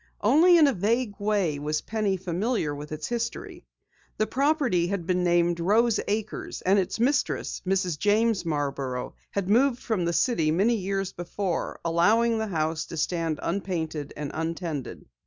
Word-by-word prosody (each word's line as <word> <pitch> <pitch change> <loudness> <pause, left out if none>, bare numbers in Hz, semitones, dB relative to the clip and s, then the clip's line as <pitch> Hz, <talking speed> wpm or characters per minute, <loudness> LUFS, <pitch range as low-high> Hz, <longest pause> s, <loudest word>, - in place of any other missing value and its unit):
Only 320 - +6
in 315 - +7
a 280 - +3
vague 220 +3 0
way 200 -8 0
was 150 +1 -1
Penny 215 -3 -1
familiar 185 -1 -1
with 145 +1 -8
its 155 0 -4
history. 235 -1 -4 0.5
The 215 - +2
property 270 - +1
had 190 -2 -3
been 180 0 +1
named 175 -1 +2
Rose 220 +5 +3
Acres 215 +1 -3
and 195 +2 +4
its 190 +3 -2
mistress, 270 +4 0
Mrs. 185 -5 0
James 215 +1 +2
Marborough, 140 -5 -3 0.2
had 200 -2 -2
moved 245 +5 +3
from 205 -7 -1
the 170 - +1
city 170 -7 +2
many 195 +9 +3
years 195 -2 -2
before, 175 +1 -3
allowing 220 +8 +3
the 220 - -2
house 160 -3 -1
to 165 - -7
stand 165 -1 -1
unpainted 165 -5 -3
and 145 -1 -4
untended. 160 -3 -4
190 Hz, 155 wpm, -26 LUFS, 165-220 Hz, 0.5 s, in